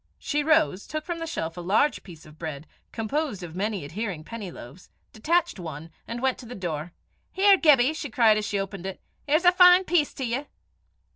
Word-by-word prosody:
She 295 Hz, -1 st, -1 dB
rose, 310 Hz, -, +2 dB
took 310 Hz, 0 st, -5 dB
from 345 Hz, -2 st, -4 dB
the 330 Hz, -, -4 dB
shelf 165 Hz, -, -4 dB
a -, -, -5 dB
large 210 Hz, +11 st, +1 dB
piece 165 Hz, -4 st, -13 dB
of 155 Hz, 0 st, -16 dB
bread, 155 Hz, -2 st, -6 dB, 0.3 s
composed 230 Hz, -, -3 dB
of 170 Hz, -1 st, -8 dB
many 200 Hz, -3 st, -2 dB
adhering 180 Hz, 0 st, -5 dB
penny 215 Hz, +1 st, -7 dB
loaves, 160 Hz, +1 st, -12 dB, 0.2 s
detached 335 Hz, -, 0 dB
one, 160 Hz, -1 st, -8 dB, 0.2 s
and 235 Hz, +2 st, -5 dB
went 265 Hz, -1 st, +1 dB
to 245 Hz, -, -11 dB
the 245 Hz, -, -8 dB
door. 170 Hz, -3 st, -4 dB, 0.4 s
"Here, 395 Hz, +1 st, +5 dB
Gibbie!" 295 Hz, -5 st, +4 dB
she 305 Hz, -3 st, -5 dB
cried 220 Hz, -2 st, +4 dB
as 210 Hz, -, -4 dB
she 205 Hz, -, -1 dB
opened 195 Hz, -1 st, -5 dB
it; 190 Hz, -, -6 dB, 0.3 s
"here's 310 Hz, +5 st, +2 dB
a 355 Hz, -, +8 dB
fine 360 Hz, 0 st, +7 dB
piece 335 Hz, -5 st, +1 dB
to 265 Hz, -, -3 dB
ye." 255 Hz, +5 st, -3 dB
225 Hz, 205 wpm, -26 LUFS, -, 0.4 s, a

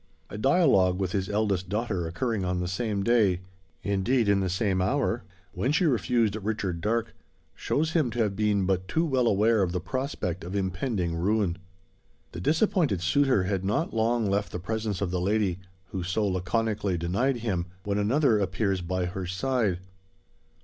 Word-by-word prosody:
A 105 Hz, -, -5 dB
dialogue 130 Hz, -, +4 dB
with 95 Hz, -2 st, -1 dB
his 95 Hz, -2 st, -1 dB
eldest 100 Hz, -3 st, 0 dB
daughter 105 Hz, -5 st, -1 dB
occurring 110 Hz, +4 st, -2 dB
on 90 Hz, 0 st, -1 dB
the 90 Hz, -, -2 dB
same 100 Hz, +1 st, -2 dB
day 105 Hz, -6 st, +3 dB, 0.4 s
indeed 105 Hz, +4 st, +1 dB
in 100 Hz, -1 st, +4 dB
the 95 Hz, -1 st, 0 dB
same 95 Hz, 0 st, 0 dB
hour 120 Hz, +3 st, 0 dB, 0.3 s
when 100 Hz, +8 st, 0 dB
she 170 Hz, +4 st, +2 dB
refused 115 Hz, -, +2 dB
Richard 100 Hz, -5 st, -2 dB
Darke, 115 Hz, +3 st, -1 dB, 0.4 s
shows 160 Hz, +2 st, -1 dB
him 155 Hz, -7 st, +2 dB
to 115 Hz, -, -7 dB
have 100 Hz, -2 st, -1 dB
been 105 Hz, -2 st, +1 dB
but 95 Hz, -1 st, 0 dB
too 160 Hz, -, +1 dB
well 130 Hz, -6 st, +1 dB
aware 110 Hz, +1 st, +3 dB
of 90 Hz, -2 st, 0 dB
the 90 Hz, -, 0 dB
prospect 90 Hz, -, -3 dB
of 90 Hz, +3 st, -6 dB
impending 95 Hz, -2 st, -1 dB
ruin. 95 Hz, 0 st, 0 dB, 0.7 s
The 85 Hz, -, -7 dB
disappointed 155 Hz, -, +2 dB
suitor 125 Hz, +3 st, +3 dB
had 95 Hz, 0 st, -1 dB
not 105 Hz, -, -1 dB
long 115 Hz, 0 st, +1 dB
left 100 Hz, +1 st, 0 dB
the -, -, -3 dB
presence 105 Hz, +1 st, -3 dB
of 95 Hz, -3 st, -1 dB
the 90 Hz, -1 st, -1 dB
lady, 100 Hz, -2 st, +1 dB, 0.3 s
who 95 Hz, -, -3 dB
so 95 Hz, +5 st, 0 dB
laconically 100 Hz, +1 st, -1 dB
denied 100 Hz, +11 st, 0 dB
him, 95 Hz, -7 st, -2 dB, 0.2 s
when 100 Hz, +1 st, -1 dB
another 115 Hz, +2 st, +3 dB
appears 95 Hz, 0 st, 0 dB
by 90 Hz, +1 st, -1 dB
her 90 Hz, +1 st, -4 dB
side. 100 Hz, -1 st, 0 dB
100 Hz, 170 wpm, -27 LUFS, 95-115 Hz, 0.7 s, dialogue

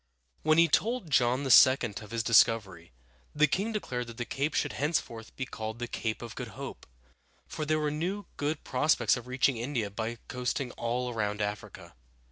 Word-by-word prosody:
When 155 Hz, 0 st, +3 dB
he 170 Hz, 0 st, +6 dB
told 220 Hz, -, 0 dB
John 125 Hz, 0 st, +3 dB
II. 130 Hz, 0 st, +8 dB, 0.2 s
of 105 Hz, -, -11 dB
his 115 Hz, -1 st, -2 dB
discovery, 105 Hz, -, +3 dB, 0.4 s
the 150 Hz, +1 st, +5 dB
king 195 Hz, +9 st, -1 dB
declared 125 Hz, -, -3 dB
that 115 Hz, -1 st, -10 dB
the 120 Hz, -, -3 dB
cape 140 Hz, +6 st, -2 dB
should -, -, 0 dB
henceforth 125 Hz, -6 st, -2 dB
be 130 Hz, -, -3 dB
called 110 Hz, -2 st, -6 dB
the 120 Hz, -, -3 dB
Cape 110 Hz, 0 st, -3 dB
of 115 Hz, -1 st, -7 dB
Good 120 Hz, -6 st, -8 dB
Hope, -, -, -8 dB, 0.6 s
for 155 Hz, -, -5 dB
there 155 Hz, 0 st, +2 dB
were 150 Hz, -1 st, 0 dB
now 180 Hz, +7 st, -3 dB
good 150 Hz, +1 st, -2 dB
prospects 125 Hz, -4 st, +2 dB
of 125 Hz, 0 st, -8 dB
reaching 130 Hz, 0 st, +1 dB
India 115 Hz, -4 st, -2 dB
by 115 Hz, +3 st, -4 dB
coasting 125 Hz, +1 st, -2 dB
all 120 Hz, +2 st, -2 dB
around 105 Hz, -2 st, -2 dB
Africa. 105 Hz, 0 st, -5 dB
125 Hz, 180 wpm, -29 LUFS, 115-150 Hz, 0.6 s, II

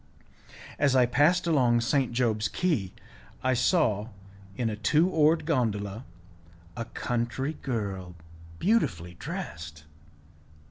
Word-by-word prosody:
As 140 Hz, -2 st, +3 dB
I 125 Hz, -1 st, +6 dB
passed 150 Hz, +9 st, +3 dB
along 125 Hz, -8 st, +3 dB
St. 130 Hz, +1 st, +1 dB
Job's 115 Hz, -4 st, +1 dB
Quay, 140 Hz, -, -1 dB, 0.5 s
I 130 Hz, 0 st, +2 dB
saw 115 Hz, -, +2 dB, 0.5 s
in 120 Hz, -, 0 dB
a 110 Hz, -, -2 dB
two 150 Hz, +10 st, +3 dB
oared 160 Hz, -2 st, +3 dB
gondola 110 Hz, -7 st, -1 dB, 0.7 s
a 115 Hz, -, -4 dB
country 120 Hz, +5 st, -2 dB
girl 100 Hz, -8 st, -4 dB, 0.4 s
beautifully 115 Hz, -, 0 dB
dressed. 80 Hz, -2 st, -7 dB
120 Hz, 105 wpm, -28 LUFS, 105-150 Hz, 0.7 s, I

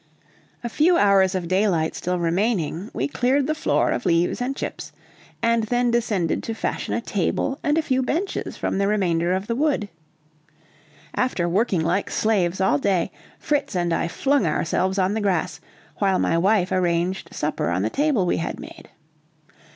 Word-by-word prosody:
A -, -, -2 dB
few 325 Hz, +9 st, +3 dB
hours 195 Hz, -, +4 dB
of 180 Hz, -2 st, -2 dB
daylight 185 Hz, -4 st, +1 dB
still 180 Hz, 0 st, -2 dB
remaining, 180 Hz, +1 st, -1 dB
we 135 Hz, -, -2 dB
cleared 250 Hz, -, +1 dB
the 310 Hz, -, 0 dB
floor 310 Hz, -, +1 dB
of -, -, -2 dB
leaves 170 Hz, +6 st, +1 dB
and 260 Hz, +2 st, -1 dB
chips, -, -, -6 dB, 0.5 s
and 230 Hz, -1 st, +2 dB
then 245 Hz, +1 st, +1 dB
descended 210 Hz, -8 st, 0 dB
to 225 Hz, -, -4 dB
fashion -, -, -2 dB
a -, -, -1 dB
table 275 Hz, +1 st, -1 dB
and 295 Hz, +1 st, +1 dB
a 325 Hz, -, +2 dB
few 260 Hz, -4 st, +1 dB
benches 335 Hz, +10 st, -2 dB
from -, -, -2 dB
the 200 Hz, -, +2 dB
remainder 175 Hz, -5 st, +1 dB
of 190 Hz, +1 st, -1 dB
the 230 Hz, -, -2 dB
wood. 270 Hz, -6 st, 0 dB, 1.2 s
After 220 Hz, -9 st, 0 dB
working 190 Hz, -1 st, +1 dB
like 175 Hz, +5 st, 0 dB
slaves 190 Hz, -5 st, +1 dB
all 190 Hz, -7 st, +2 dB
day, 190 Hz, +1 st, 0 dB, 0.3 s
Fritz 290 Hz, -9 st, -1 dB
and 175 Hz, -1 st, 0 dB
I -, -, 0 dB
flung 270 Hz, +4 st, +1 dB
ourselves 185 Hz, +5 st, 0 dB
on 190 Hz, +1 st, +2 dB
the 220 Hz, -, -1 dB
grass, 190 Hz, -5 st, -1 dB, 0.4 s
while 195 Hz, -2 st, +2 dB
my -, -, +1 dB
wife 190 Hz, +2 st, +2 dB
arranged 180 Hz, 0 st, 0 dB
supper 150 Hz, -, -2 dB
on 90 Hz, +2 st, 0 dB
the 110 Hz, -, -1 dB
table 285 Hz, -10 st, +1 dB
we -, -, +1 dB
had 165 Hz, -, -4 dB
made. -, -, -11 dB
195 Hz, 175 wpm, -23 LUFS, 175-240 Hz, 1.2 s, hours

